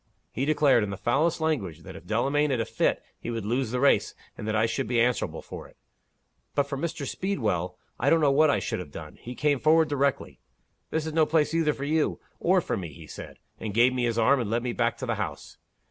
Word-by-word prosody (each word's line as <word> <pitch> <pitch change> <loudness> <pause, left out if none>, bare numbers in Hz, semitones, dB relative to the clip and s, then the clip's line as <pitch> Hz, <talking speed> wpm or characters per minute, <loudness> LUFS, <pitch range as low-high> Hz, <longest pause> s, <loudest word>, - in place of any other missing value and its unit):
He 130 - -2
declared, 145 -6 +4
in 105 - -3
the 100 - -5
foulest 145 - +1
language, 110 - -1
that - - -10
if 90 - -12
Delamayn 140 +7 +1
had 130 -3 0
a 115 - 0
fit, - - 0 0.2
he - - -6
would 115 -3 -3
lose 120 +2 0
the 125 +2 -1
race, 140 +2 +3 0.2
and 105 - -7
that 110 - 0
I 110 +1 +3
should 115 -1 -2
be 120 0 +1
answerable 120 +1 0
for - - -9
it. - - -23 0.8
But 145 - +3
for 140 0 -5
Mr. 160 0 -3
Speedwell, 105 - -2 0.2
I 135 - +2
don't 165 - +5
know 145 -3 +4
what 155 +2 +5
I - - +3
should - - -3
have - - -7
done. - - -9
He 125 +1 -7
came 145 -1 +1
forward 160 +2 +4
directly. 140 -1 -1 0.5
'This 160 -1 -1
is 160 - -4
no 160 -1 +3
place 160 -1 +2
either 160 -2 +2
for 140 - -5
you, 155 +1 +1 0.2
or 185 +1 +3
for - - -2
me,' 85 -7 -6
he - - -12
said - - -10 0.2
and 105 -2 -5
gave 120 +2 +5
me 125 -1 0
his 115 -1 -1
arm, 125 +5 +4
and 115 -4 -2
led 115 +2 0
me 125 -1 -2
back 115 0 0
to 130 - -4
the 115 -2 -1
house. 75 -8 -6
130 Hz, 245 wpm, -27 LUFS, 115-150 Hz, 0.8 s, don't